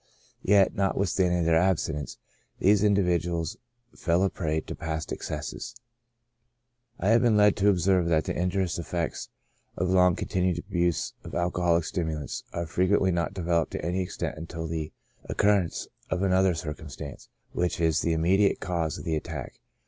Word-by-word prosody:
Yet, 100 -1 +4
notwithstanding 95 -2 +1
their 80 0 +4
abstinence, 80 -5 -1 0.4
these 100 +1 +4
individ 95 -5 +3
uals 85 +4 -3 0.4
fell 85 +2 +1
a 95 - +1
prey 80 -3 -1
to - - -7
past 80 0 -4
excesses. 115 - -5 1.2
I 95 - +1
have 115 +1 +5
been 115 -3 +4
led 105 -1 +5
to 100 0 +4
observe 90 -2 +3
that 80 -2 +2
the - - -3
injurious 90 -1 0
effects 85 0 -3 0.5
of 90 +1 0
the - - +2
long 90 -2 +5
continued 90 -1 0
abuse 85 -2 -1
of - - -8
alcoholic 85 -1 +1
stimulants, 80 -6 -3
are 85 - -3
fre 90 +3 0
quently 95 -1 +3
not 85 +3 -1
developed 85 -3 0
to - - -4
any 90 +2 0
extent 90 -3 -4
until 80 0 -6
the 80 -1 -4 0.3
occurrence 100 -4 +1 0.2
of 90 +1 -1
another 95 -1 +3
circumstance, 75 -2 -7 0.2
which 90 -1 -1
is 80 -2 +2
the 85 - +1
immediate 95 +5 +3
cause 85 -4 -2
of - - -8
the 80 -3 -1
attack. 75 -3 -6
90 Hz, 160 wpm, -27 LUFS, 80-95 Hz, 1.2 s, have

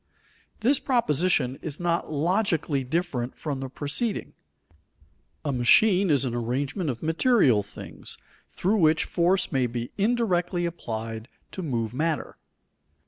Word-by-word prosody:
_ - - -34
This 265 +5 +3
proposition 160 - +1
is 150 -2 -5
not 170 -2 -1
logically 160 -3 0
different 130 -3 -2
from 145 -4 -4
the 135 0 -5
preceding. 150 - -3 1.1
A 145 - 0
machine 185 - +4
is 140 -3 +3
an 120 - -2
arrangement 135 - -2
of 120 +1 -4
material 160 - +3
things 100 - -11 0.3
through 200 +5 0
which 160 -3 +3
force 180 +2 +1
may 130 -3 +1
be 120 0 -5
indirectly 190 -6 +1
applied 115 -8 -5 0.2
to 190 - -6
move 120 - -2
matter. 155 +3 -2
155 Hz, 130 wpm, -26 LUFS, 125-180 Hz, 1.1 s, machine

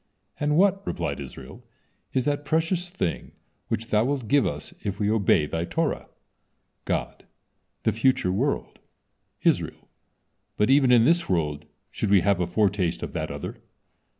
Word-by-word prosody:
"And 150 +1 +1
what," 195 +1 +4
replied 80 -5 -2
Israel, 65 -1 -10 0.5
"is 130 -2 0
that 145 0 0
precious 165 +4 0
thing 175 - -3 0.3
which 115 +3 -3
Thou 105 0 +4
wilt 135 -4 -2
give 140 +4 +3
us 75 0 -5
if 100 -1 -3
we 105 0 +1
obey 100 -8 +3
Thy 80 +2 -2
Torah?" 165 - -1 0.8
God: - - -3 0.6
"The 110 - +3
future 110 -4 +2
world." 130 +10 -1 0.6
Israel: - - 0 0.7
"But 105 +5 +3
even 135 -2 +5
in 120 -2 +6
this 170 +4 +2
world 75 -5 -1 0.3
should 105 - -2
we 100 -2 +5
have 100 0 +2
a 90 - 0
foretaste 95 -2 +1
of - - -5
that - - -3
other." - - -6
110 Hz, 150 wpm, -25 LUFS, 90-145 Hz, 0.8 s, in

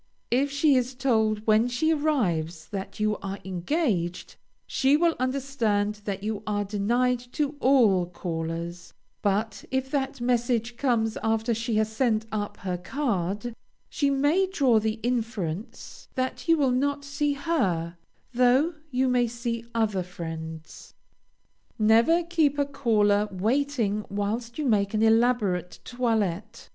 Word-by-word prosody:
If 270 +4 +2
she 285 +1 +3
is 255 0 0
told 220 -5 +1
when 220 +2 +4
she 295 +6 +1
arrives 180 - 0
that 195 +1 -6
you 215 0 +1
are 195 0 -5
engaged, 185 - -1 0.3
she 270 +2 +3
will 335 0 +2
understand 240 -6 -1
that 195 -1 -4
you 210 -1 -2
are 205 -1 0
denied 235 +5 +1
to 295 -1 -1
all 225 -10 +4
callers, 170 0 -5 0.3
but 205 0 -1
if 265 0 -2
that 270 -2 -1
message 240 -1 0
comes 235 -4 0
after 225 +1 +1
she 230 0 -2
has 215 0 +1
sent 220 -3 +1
up 205 -1 -3
her 180 -1 -2
card, 210 -1 -2 0.4
she 285 -3 +1
may 290 +8 +2
draw 270 - +3
the 220 +1 -2
inference 225 -5 -4
that 260 +6 -3
you 330 0 +5
will 275 -4 +2
not 285 +3 0
see 285 +1 0
her, 190 - -1 0.4
though 255 +7 +3 0.2
you 260 -1 +1
may 250 -1 +2
see 235 0 -4
other 215 -4 +1
friends. 160 -2 -8 0.8
Never 230 +10 +4
keep 320 -4 +1
a 285 - +2
caller 210 -6 +2
waiting 220 +1 0
whilst 220 +4 -3
you 305 - -2
make 205 -4 +2
an 215 - +2
elaborate 220 -6 +2
toilette. 225 -4 -2
230 Hz, 135 wpm, -26 LUFS, 205-265 Hz, 0.8 s, you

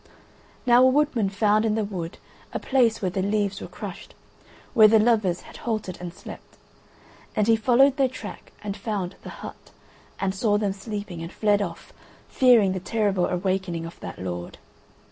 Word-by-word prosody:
Now 245 0 +6
a 260 - +7
woodman 260 -6 +2
found 210 +2 +2
in 220 -1 +1
the 220 - 0
wood 180 -5 -5 0.4
a - - -2
place 235 -5 +2
where 185 - 0
the 190 - -1
leaves 200 0 0
were - - -6
crushed, - - -9 0.6
where 220 -4 +8
the 220 +1 +5
lovers 215 -5 +2
had - - -13
halted 215 -6 -3
and 175 -1 -5
slept, 175 - -12 0.8
and 210 - +2
he 225 +1 +5
followed 255 +4 +4
their 270 -2 +3
track 235 -4 -9
and 200 -1 -3
found 200 -5 -3
the - - -9
hut, - - -10 0.5
and 190 -1 0
saw 205 +1 +1
them 205 -2 0
sleeping 200 -4 -6
and 165 +1 -6
fled 205 -1 +2
off, 175 -4 -6 0.3
fearing 240 -7 +5
the 185 - -2
terrible 200 -2 0
awakening 180 -2 -1
of 165 - -10
that - - -7
lord. 90 -1 -5
205 Hz, 175 wpm, -25 LUFS, 185-225 Hz, 0.8 s, where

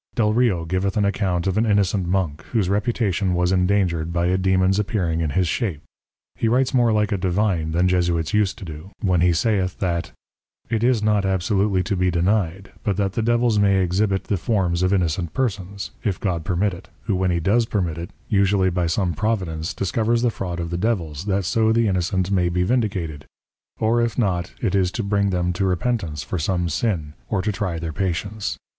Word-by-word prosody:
Delrio 105 -6 +2
giveth 95 +4 -1
an 105 - +3
account 95 -3 0
of 95 +2 +1
an 115 - +2
innocent 100 -3 +2
Monk, 85 -4 -1
whose 105 -6 +1
Reputation 100 -3 0
was 90 +1 +1
indangered 90 -3 +1
by 85 0 0
a 90 +1 +2
Dæmon's 95 +1 +2
appearing 95 -6 -1
in 80 - 0
his 90 +3 +1
shape. 90 - -2 0.5
He 115 - -1
writes 130 +4 +2
more 120 -3 +4
like 105 0 +1
a 100 - 0
Divine 90 -3 0
than 90 +3 +2
Jesuits 85 -1 +1
use 105 -2 +3
to 95 - -9
do, 80 +3 -9
when 90 -4 +2
he 90 0 +4
saith 95 +1 0
that, 85 -3 -2 0.6
_It 110 -2 +1
is 120 -2 +2
not 105 -2 +2
absolutely 95 0 +1
to 100 - -1
be 90 0 +1
denied, 95 +1 0
but 100 -5 0
that 100 -2 0
the 115 - -1
Devils 120 -1 +2
may 100 -1 +4
exhibite 95 +2 0
the 100 - -1
Forms 90 -3 0
of 95 0 +2
innocent 90 -3 0
Persons, 100 -5 -3
if 100 -6 -1
God 90 -5 -1
permit 95 +3 0
it, 95 +2 -11
who 105 - 0
when 95 0 +1
he 85 -1 +1
does 110 +7 +2
permit 85 -7 -1
it, 85 - -6 0.2
usually 100 -3 +2
by 90 -1 0
some 85 +1 0
Providence 90 -5 -2
discovers 115 +4 0
the 120 - +3
Fraud 90 -5 -4
of 85 -1 -4
the 85 - -2
Devils, 90 -7 -1
that 100 -2 0
so 110 +4 +2
the 115 0 +3
Innocent 95 0 0
may 90 -3 +2
be 90 +1 0
vindicated, 95 - -1 0.5
or 115 +2 +2
if 115 -1 -1
not, 95 -7 0
it 105 - +1
is 95 -2 +2
to 115 - -2
bring 100 0 +1
them 90 -1 0
to 85 - -2
repentance 90 - -1
for 90 - -3
some 90 +2 0
Sin, 80 -4 -1 0.2
or 95 -4 0
to 105 - 0
try 95 -4 -2
their 80 -1 -4
Patience. 100 +4 -2
95 Hz, 200 wpm, -22 LUFS, 85-105 Hz, 0.6 s, more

